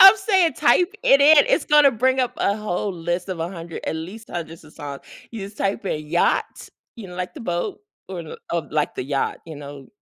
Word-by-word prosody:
I'm 385 +2 +11
saying 385 -5 +2
type 345 - +3
it 275 - +5
in. 295 +1 +8
It's - - +2
gonna 295 -2 +6
bring 260 +3 +1
up 250 - 0
a 200 +1 +1
whole 210 -1 -2
list 175 +2 -3
of 180 -3 -4
100, 170 -1 -5
at - - -1
least 190 +8 -8
hundreds 165 -1 -6
of 155 - -16
songs. 145 -3 -8 0.3
You 225 -3 -7
just 200 +1 -11
type 200 +2 -1
in 155 -4 -3
Yacht, 170 +3 0 0.3
you 215 -5 -9
know, 180 - -10
like 180 - -4
the 290 - -9
boat 175 - -3 0.3
or 185 -2 -5
l 160 - -8
of 170 -4 -2
like 150 -1 0
the - - -4
yacht, 140 0 -1
you 160 - -8
know? 140 -1 -10
185 Hz, 220 wpm, -22 LUFS, 165-255 Hz, 0.3 s, I'm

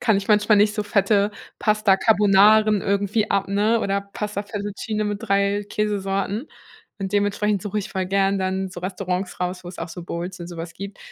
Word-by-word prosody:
kann 225 -4 +3
ich 195 +1 -3
manchmal 210 0 +4
nicht 210 +1 +4
so 210 - -1
fette 205 0 +2 0.3
Pasta 215 -2 +3
Carbonaras 210 0 +5
irgendwie 200 +2 0
ab 200 -1 +1
oder 200 0 +1
Pasta 210 -1 -3
Fettuccine 205 +1 -4
mit 205 -1 -2
3 200 +1 +1
Käsesorten. 205 +3 -2 0.5
Und 195 0 -3
dementsprechend 205 -1 +1
suche 210 +1 -2
ich 200 - -4
voll 190 -1 -2
gern 195 0 +1
dann 190 0 -1
so 180 - -8
Restaurants 185 0 -3
raus, 180 0 -3
wo - - -7
es 180 - -10
auch - - -4
so 175 +2 -8
Bowls 175 +2 -5
und 170 - -7
so 175 - -9
was 165 0 -6
gibt. 200 +2 -8
200 Hz, 190 wpm, -23 LUFS, 190-210 Hz, 0.5 s, Carbonaras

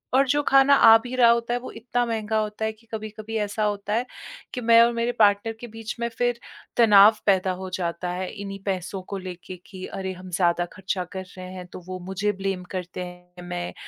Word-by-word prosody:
और 270 +1 +4
जो 290 +3 +2
खाना 275 0 +5
आ 225 -4 +8
भी 250 0 -5
रहा 240 -2 +6
होता 235 0 0
है, 245 - 0
वो 250 - -8
इतना 240 +2 -2
महँगा 220 -2 -1
होता 215 0 -2
है 220 - 0
कि 225 +1 -26
कभी-कभी 215 0 -6
ऐसा 210 +1 -2
होता 205 0 -1
है 235 +3 +1 0.5
कि 250 - -3
मैं 230 0 +6
और 235 +1 +5
मेरे 235 +1 0
पार्टनर 205 +1 +4
के 240 - -6
बीच 225 -1 -7
में 235 - +1
फिर 245 +1 -1 0.4
तनाव 215 -2 +7
पैदा 190 -2 +3
हो 190 0 -6
जाता 175 0 -3
है, 185 +1 -3
इन्हीं 195 -1 -7
पैसों 190 0 -3
को 200 - -2
लेके 185 -1 -8
कि, 185 -1 -8
"अरे! 190 -1 -5
हम 185 0 -11
ज़्यादा 175 -1 +2
ख़र्चा 190 0 -3
कर 190 -1 -4
रहे 185 - -7
हैं।" 180 -1 -7
तो - - -7
वो 185 0 -5
मुझे 195 +2 0
ब्लेम 195 -2 -2
करते 180 0 -5
हैं, 180 0 -12
मैं 175 0 -5
205 Hz, 220 wpm, -24 LUFS, 185-230 Hz, 0.5 s, आ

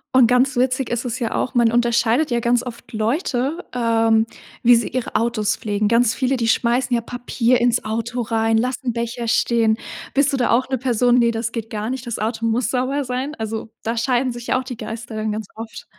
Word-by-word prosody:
Und 255 -3 +7
ganz 250 +3 +3
witzig 255 +1 +1
ist 240 +1 -2
es 245 0 -2
ja 230 -3 -2
auch 255 - -2
man 235 -2 +4
unterscheidet 240 +4 +2
ja 240 - +2
ganz 235 +1 +2
oft 240 -2 -9
Leute, 255 - -1
ähm, 225 -2 +2 0.4
wie 240 +1 +7
sie 230 - +1
ihre 255 -1 -4
Autos 220 -2 +1
pflegen. 210 -1 -1
Ganz 230 +1 +3
viele, 265 0 0
die 230 -2 -1
schmeißen 240 +2 +1
ja 235 - 0
Papier 245 +1 0
ins 240 0 +2
Auto 230 +3 -2
rein, 225 0 +1
lassen 250 +1 -2
Becher 235 0 -3
stehen. 225 -1 +2 0.4
Bist 280 +1 +3
du 275 - 0
da 250 - +1
auch 255 +3 +2
'ne 265 - 0
Person 245 -1 +2
ne, 235 -1 +3
das 225 0 -3
geht 225 -2 -5
gar 215 0 -3
nicht, 260 0 -4
das 235 - -3
Auto 225 +1 -2
muss 230 0 +1
sauber 265 +3 0
sein? 255 +4 -3
Also, 220 0 -5
da 230 +1 -2
scheiden 250 +2 +1
sich 240 0 -8
ja 255 - +2
auch - - -5
die 250 -2 -7
Geister 225 0 -7
dann 215 0 -2
ganz 215 -1 -4
oft. 225 0 -8
235 Hz, 220 wpm, -21 LUFS, 225-250 Hz, 0.4 s, Und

